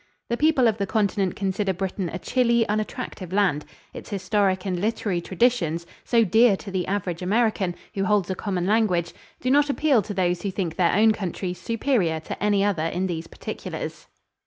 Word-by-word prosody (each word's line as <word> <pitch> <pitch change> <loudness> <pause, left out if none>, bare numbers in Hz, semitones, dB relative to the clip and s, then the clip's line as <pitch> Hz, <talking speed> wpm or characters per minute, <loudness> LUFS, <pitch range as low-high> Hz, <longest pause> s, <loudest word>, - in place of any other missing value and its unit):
The 235 - +1
people 290 -2 +3
of 220 -1 0
the 200 - -1
Continent 200 -2 0
consider 195 0 -1
Britain 185 0 -3
a 175 - -4
chilly, 235 +2 +2
unattractive 210 -3 -3
land. 185 -7 +1 0.3
Its - - -9
historic 195 -1 0
and 185 -2 -1
literary 205 -3 -1
traditions, 175 -5 +1 0.2
so 235 -2 +3
dear 220 +1 +4
to 195 - -9
the 185 -2 -2
average 185 -3 -2
American, 200 -2 +1 0.2
who 195 -1 -1
holds 205 -3 +2
a - - +1
common 185 -2 -2
language, 195 -5 +1 0.3
do 255 - 0
not 290 +1 +4
appeal 280 -4 +3
to 205 - -6
those 180 -1 +1
who 200 - -2
think 180 -4 -3
their 175 -1 +2
own 220 +2 +5
countries 185 -3 -4
superior 220 - 0
to 160 - -6
any 205 -1 +3
other 185 -6 +1
in 180 +3 -2
these 165 -2 -4
particulars. - - -7
195 Hz, 185 wpm, -24 LUFS, 180-220 Hz, 0.3 s, own